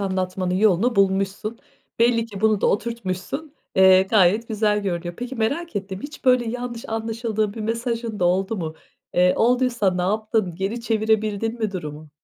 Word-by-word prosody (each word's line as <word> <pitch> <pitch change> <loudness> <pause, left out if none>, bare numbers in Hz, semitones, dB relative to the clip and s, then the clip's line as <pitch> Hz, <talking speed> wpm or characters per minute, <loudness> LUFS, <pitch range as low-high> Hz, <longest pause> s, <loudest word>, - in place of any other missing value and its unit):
anlatmanın 185 -1 -1
yolunu 215 +4 +3
bulmuşsun. 195 +3 +1 0.4
Belli 230 -1 +3
ki 205 -3 -9
bunu 215 -2 +3
da - - +2
oturtmuşsun, 230 - -2 0.2
eee, 190 0 +7
gayet 205 +3 +3
güzel 210 -1 +1
görünüyor. 175 -2 -3
Peki, 245 +2 -5
merak 280 +7 -1
ettim 195 -1 -4
hiç 290 0 -9
böyle 250 -1 +4
yanlış 245 -1 -5
anlaşıldığın 225 -1 -2
bir 225 - -6
mesajın 230 0 -2
da - - +3
oldu 190 +5 +1
mu? 160 -3 -4 0.4
Eee, 180 +1 +5
olduysa 240 -4 +2
ne 180 - -1
yaptın? 215 -2 0
Geri 195 +6 -3
çevirebildin 220 0 0
mi 215 -3 -1
durumu? 155 -4 -7
215 Hz, 155 wpm, -23 LUFS, 190-230 Hz, 0.4 s, eee